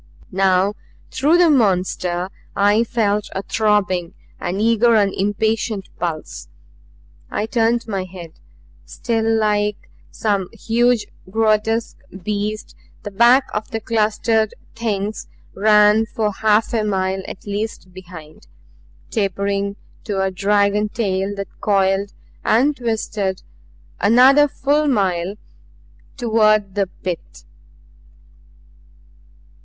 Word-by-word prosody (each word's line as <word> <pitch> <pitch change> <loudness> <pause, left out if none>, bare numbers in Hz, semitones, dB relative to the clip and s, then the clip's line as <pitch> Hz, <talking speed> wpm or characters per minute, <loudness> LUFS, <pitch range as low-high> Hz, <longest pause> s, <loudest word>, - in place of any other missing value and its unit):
Now 190 +1 +2 0.4
through 295 +6 +3
the 350 -2 +5
monster 185 -6 +1 0.2
I 205 +3 +3
felt 210 -3 0
a 190 - -3
throbbing, 195 -6 0 0.2
an 180 +3 -3
eager 230 +1 +3
and 200 -2 +3
impatient 210 +1 -1
pulse. 155 - -4 0.8
I 210 - -2
turned 230 +1 0
my 195 -4 -3
head. 175 -3 -11 0.4
Still 225 -1 -1
like 210 -1 -1 0.2
some 200 -4 -1
huge 235 -1 +1 0.2
and 185 - -17
grotesque 220 +1 +1 0.2
beast 210 +2 -3 0.3
the 205 - -6
back 240 +6 +5
of 210 +1 -3
the 225 - -3
clustered 220 0 0 0.2
Things 215 -2 -3 0.3
ran 210 +1 +4
for 215 -1 -1
half 215 +2 +1
a 225 -2 +1
mile 190 -2 -1
at - - -9
least 205 -2 -5
behind, 175 -4 -12 0.6
tapering 200 -1 -1 0.3
to 200 -3 -2
a 190 0 0
dragon 205 +2 +1
tail 200 -2 -2
that 200 0 -8
coiled 195 0 +1 0.3
and 265 +7 +3
twisted 215 -5 -2 0.6
another 260 +7 +6
full 290 +2 0
mile 190 -6 0 0.8
toward 215 -5 +2
the 200 -1 0
Pit. 180 - -7
210 Hz, 105 wpm, -20 LUFS, 195-225 Hz, 0.8 s, another